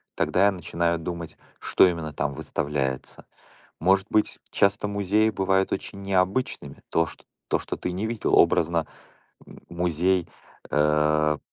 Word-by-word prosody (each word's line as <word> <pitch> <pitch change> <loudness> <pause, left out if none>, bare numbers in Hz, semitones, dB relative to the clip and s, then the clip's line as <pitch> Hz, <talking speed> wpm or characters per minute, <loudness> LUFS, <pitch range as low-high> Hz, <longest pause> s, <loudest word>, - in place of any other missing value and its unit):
Тогда 95 +2 +2
я 100 - +5
начинаю 85 -2 -1
думать, 85 0 -6 0.2
что - - +4
именно 80 -3 -3
там 70 0 -2
выставляется. 70 -2 -3 0.5
Может 95 +1 +3
быть, 105 - +1
часто 100 +1 +2
музеи 100 +2 +2
бывают 95 -1 +1
очень 100 +1 -5
необычными, 95 +5 -1
то, 80 - +2
чт - - -12 0.2
то, - - +2
что - - -5
ты 90 - -3
не 95 +4 -3
видел. 115 -1 0
Образно, 85 0 +3 0.6
м, - - -14
музей, 85 +1 0 0.4
э, 75 0 +2
90 Hz, 135 wpm, -25 LUFS, 80-95 Hz, 0.6 s, я